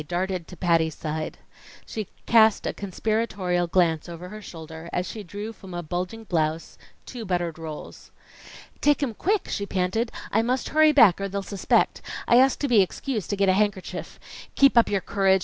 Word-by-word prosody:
darted 180 Hz, 0 st, -2 dB
to 180 Hz, -, -11 dB
Patty's 165 Hz, -3 st, +2 dB
side. 155 Hz, 0 st, -4 dB, 0.5 s
She 215 Hz, -3 st, -5 dB, 0.2 s
cast 220 Hz, -2 st, +5 dB
a -, -, -1 dB
conspiratorial 200 Hz, -3 st, -1 dB
glance 170 Hz, -2 st, +1 dB
over 170 Hz, +1 st, -8 dB
her 215 Hz, +2 st, -9 dB
shoulder 160 Hz, -2 st, -9 dB
as 180 Hz, -, -1 dB
she 220 Hz, -, -6 dB
drew 205 Hz, +4 st, -7 dB
from 190 Hz, -4 st, -11 dB
a 175 Hz, -, -4 dB
bulging 180 Hz, +7 st, -4 dB
blouse 160 Hz, -4 st, -1 dB, 0.3 s
two 245 Hz, -3 st, -7 dB
buttered 175 Hz, -4 st, -2 dB
rolls. 155 Hz, -2 st, -8 dB, 0.7 s
"Take 295 Hz, 0 st, +3 dB
'em 245 Hz, -5 st, -1 dB
quick!" 400 Hz, -, 0 dB
she 200 Hz, -, -3 dB
panted. 195 Hz, +6 st, -1 dB, 0.2 s
"I 220 Hz, -, +3 dB
must 250 Hz, +3 st, -1 dB
hurry 310 Hz, 0 st, +5 dB
back, 220 Hz, -, +6 dB
or 195 Hz, -, -2 dB
they'll 200 Hz, +1 st, -3 dB
suspect. 195 Hz, -1 st, +1 dB, 0.3 s
I 240 Hz, -, +6 dB
asked 265 Hz, +1 st, +4 dB
to 285 Hz, -, +1 dB
be 235 Hz, -6 st, +5 dB
excused 215 Hz, +3 st, -3 dB
to 205 Hz, -, 0 dB
get 200 Hz, 0 st, +2 dB
a 185 Hz, -, +5 dB
handkerchief. 205 Hz, -1 st, -2 dB, 0.4 s
Keep 275 Hz, -2 st, +5 dB
up 235 Hz, -, +5 dB
your 200 Hz, -2 st, 0 dB
courage. 195 Hz, 0 st, +2 dB
195 Hz, 185 wpm, -25 LUFS, 175-225 Hz, 0.7 s, back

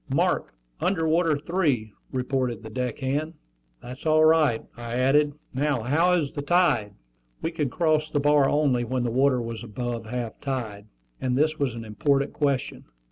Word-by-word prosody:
"Mark -, -, 0 dB, 0.2 s
under 165 Hz, -4 st, 0 dB
water 160 Hz, -1 st, +2 dB
three," 145 Hz, -, -1 dB, 0.2 s
reported 125 Hz, -3 st, -2 dB
the 110 Hz, -, -8 dB
deck 125 Hz, -1 st, -3 dB
hand. 145 Hz, +5 st, -2 dB, 0.5 s
"That's 125 Hz, +5 st, -7 dB
all 155 Hz, 0 st, +5 dB
right," 155 Hz, -7 st, +3 dB
I 120 Hz, 0 st, -6 dB
added. 145 Hz, +4 st, +3 dB, 0.2 s
"Now 135 Hz, -3 st, 0 dB
how 165 Hz, +9 st, +3 dB
is 145 Hz, -4 st, -3 dB
the 145 Hz, -, -3 dB
tide?" 145 Hz, -, +2 dB, 0.5 s
We 165 Hz, -, -1 dB
could 150 Hz, -4 st, -1 dB
cross 155 Hz, +1 st, +1 dB
the 145 Hz, -, 0 dB
bar 145 Hz, -1 st, +4 dB
only 140 Hz, -5 st, +2 dB
when 125 Hz, +1 st, -1 dB
the 120 Hz, -, -1 dB
water 130 Hz, +1 st, +3 dB
was 115 Hz, -1 st, -5 dB
above 120 Hz, 0 st, -4 dB
half 120 Hz, -1 st, -4 dB
tide; 110 Hz, -7 st, -4 dB, 0.3 s
and 125 Hz, -1 st, 0 dB
this 155 Hz, +2 st, +1 dB
was 135 Hz, -5 st, 0 dB
an 115 Hz, -1 st, -7 dB
important 140 Hz, +6 st, 0 dB
question. 140 Hz, -3 st, -1 dB
135 Hz, 170 wpm, -25 LUFS, 120-155 Hz, 0.5 s, all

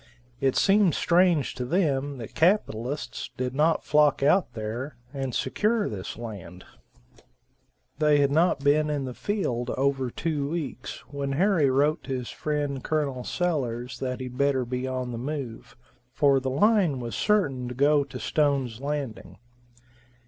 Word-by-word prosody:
It 135 Hz, -1 st, +1 dB
seemed 195 Hz, -4 st, +4 dB
strange 170 Hz, -5 st, +3 dB
to 125 Hz, -, -4 dB
them 145 Hz, -2 st, 0 dB
that 115 Hz, -3 st, -8 dB
capitalists 150 Hz, -, 0 dB
did 125 Hz, 0 st, -2 dB
not 155 Hz, +4 st, +2 dB
flock 150 Hz, -2 st, +3 dB
out 160 Hz, -2 st, +3 dB
there 115 Hz, +6 st, -4 dB, 0.2 s
and 135 Hz, -3 st, -3 dB
secure 215 Hz, 0 st, +1 dB
this 100 Hz, -2 st, -6 dB
land. 100 Hz, -6 st, -8 dB, 1.3 s
They 150 Hz, -1 st, +4 dB
had 140 Hz, -1 st, +3 dB
not 160 Hz, -1 st, +3 dB
been 150 Hz, +2 st, +3 dB
in 145 Hz, -2 st, -1 dB
the 130 Hz, -, -5 dB
field 125 Hz, -, -2 dB
over 135 Hz, -1 st, +1 dB
two 145 Hz, +1 st, -2 dB
weeks 150 Hz, -6 st, -5 dB
when 140 Hz, -1 st, -3 dB
Harry 170 Hz, -2 st, +3 dB
wrote 145 Hz, +5 st, +2 dB
to 135 Hz, -2 st, -2 dB
his 125 Hz, -1 st, -6 dB
friend 145 Hz, -3 st, -2 dB
Col. 140 Hz, -5 st, -1 dB
Sellers 125 Hz, -9 st, -2 dB
that 130 Hz, -1 st, -3 dB
he'd 125 Hz, 0 st, -7 dB
better 140 Hz, -2 st, +2 dB
be 125 Hz, +2 st, -3 dB
on 130 Hz, -1 st, -3 dB
the 115 Hz, -, -5 dB
move, 130 Hz, -3 st, -6 dB, 0.3 s
for 140 Hz, 0 st, +3 dB
the 130 Hz, 0 st, -3 dB
line 180 Hz, -, +3 dB
was 120 Hz, -1 st, -5 dB
certain 140 Hz, -, +1 dB
to 125 Hz, -, -6 dB
go 145 Hz, +2 st, +4 dB
to 135 Hz, -2 st, -9 dB
Stone's 135 Hz, -7 st, 0 dB
Landing. 140 Hz, -5 st, -4 dB
140 Hz, 150 wpm, -26 LUFS, 125-155 Hz, 1.3 s, seemed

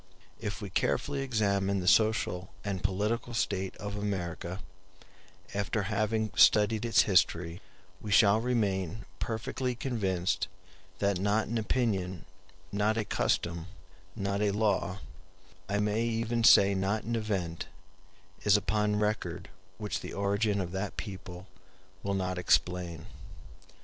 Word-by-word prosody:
If 105 Hz, +1 st, -4 dB
we 100 Hz, -, -6 dB
carefully 135 Hz, -, 0 dB
examine 100 Hz, -6 st, +1 dB
the 90 Hz, -, -4 dB
social 95 Hz, -4 st, +3 dB
and 100 Hz, -3 st, -3 dB
political 105 Hz, +5 st, -1 dB
state 95 Hz, -4 st, -1 dB
of 100 Hz, 0 st, -5 dB
America, 95 Hz, -3 st, -3 dB, 0.9 s
after 100 Hz, +1 st, -1 dB
having 110 Hz, +1 st, 0 dB
studied 105 Hz, +1 st, +5 dB
its 115 Hz, -2 st, +5 dB
history, 90 Hz, -2 st, +2 dB, 0.4 s
we 105 Hz, -, -6 dB
shall 100 Hz, +1 st, +5 dB
remain 105 Hz, -5 st, -1 dB
perfectly 125 Hz, +3 st, -2 dB
convinced 95 Hz, -8 st, -1 dB, 0.5 s
that 100 Hz, -2 st, +1 dB
not 105 Hz, +3 st, +1 dB
an 115 Hz, 0 st, 0 dB
opinion, 100 Hz, -6 st, -1 dB, 0.5 s
not 105 Hz, +2 st, +1 dB
a 110 Hz, -, 0 dB
custom, 85 Hz, -3 st, -1 dB, 0.5 s
not 100 Hz, -1 st, -1 dB
a 105 Hz, -, +3 dB
law, 100 Hz, -2 st, 0 dB, 0.7 s
I 100 Hz, -, +1 dB
may 105 Hz, +2 st, +1 dB
even 115 Hz, 0 st, 0 dB
say 100 Hz, -3 st, +7 dB
not 100 Hz, +3 st, 0 dB
an 115 Hz, +1 st, -2 dB
event, 95 Hz, -7 st, -2 dB, 0.8 s
is 105 Hz, 0 st, +6 dB
upon 105 Hz, 0 st, +1 dB
record 105 Hz, +1 st, -2 dB, 0.3 s
which 105 Hz, -1 st, -3 dB
the -, -, -7 dB
origin 100 Hz, +1 st, +1 dB
of 90 Hz, -2 st, -3 dB
that 95 Hz, +2 st, -4 dB
people 95 Hz, -3 st, -7 dB, 0.6 s
will 100 Hz, 0 st, -1 dB
not 90 Hz, -1 st, -1 dB
explain. 90 Hz, -2 st, +1 dB
100 Hz, 125 wpm, -30 LUFS, 95-110 Hz, 0.9 s, say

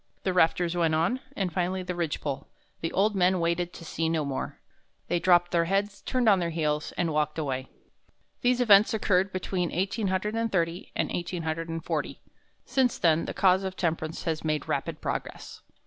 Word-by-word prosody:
The 190 Hz, -, 0 dB
rafters 175 Hz, 0 st, +2 dB
went 165 Hz, -2 st, +2 dB
on, 170 Hz, +11 st, +1 dB, 0.2 s
and 185 Hz, -4 st, -2 dB
finally 185 Hz, +1 st, -1 dB
the 180 Hz, 0 st, -3 dB
ridge 170 Hz, -3 st, -2 dB
pole. 140 Hz, 0 st, -4 dB, 0.3 s
The 165 Hz, -, -3 dB
old 205 Hz, +2 st, +2 dB
men 185 Hz, 0 st, +3 dB
waited 170 Hz, +1 st, 0 dB
to 170 Hz, -, -10 dB
see 160 Hz, 0 st, -1 dB
no 160 Hz, -2 st, 0 dB
more. 140 Hz, -1 st, -4 dB, 0.5 s
They 175 Hz, -, +2 dB
dropped 175 Hz, 0 st, +4 dB
their 170 Hz, -1 st, +2 dB
heads, 200 Hz, +3 st, -1 dB
turned 255 Hz, -3 st, 0 dB
on 200 Hz, -3 st, +6 dB
their 170 Hz, -1 st, -1 dB
heels, 150 Hz, -2 st, -1 dB
and 170 Hz, -3 st, -1 dB
walked 150 Hz, 0 st, 0 dB
away." 135 Hz, -4 st, -2 dB, 0.7 s
These 250 Hz, 0 st, +2 dB
events 215 Hz, -2 st, +6 dB
occurred 195 Hz, -2 st, +2 dB
between 185 Hz, -1 st, -2 dB
1830 190 Hz, -1 st, -1 dB
and -, -, -1 dB
1840. 165 Hz, -2 st, -3 dB, 0.5 s
Since 255 Hz, -3 st, +1 dB
then 165 Hz, -1 st, +3 dB
the -, -, -5 dB
cause 185 Hz, 0 st, +4 dB
of 190 Hz, -1 st, -4 dB
temperance 160 Hz, -2 st, -2 dB
has 160 Hz, -2 st, -2 dB
made 155 Hz, -2 st, -1 dB
rapid -, -, -2 dB
progress. -, -, -5 dB
175 Hz, 170 wpm, -27 LUFS, 165-190 Hz, 0.7 s, on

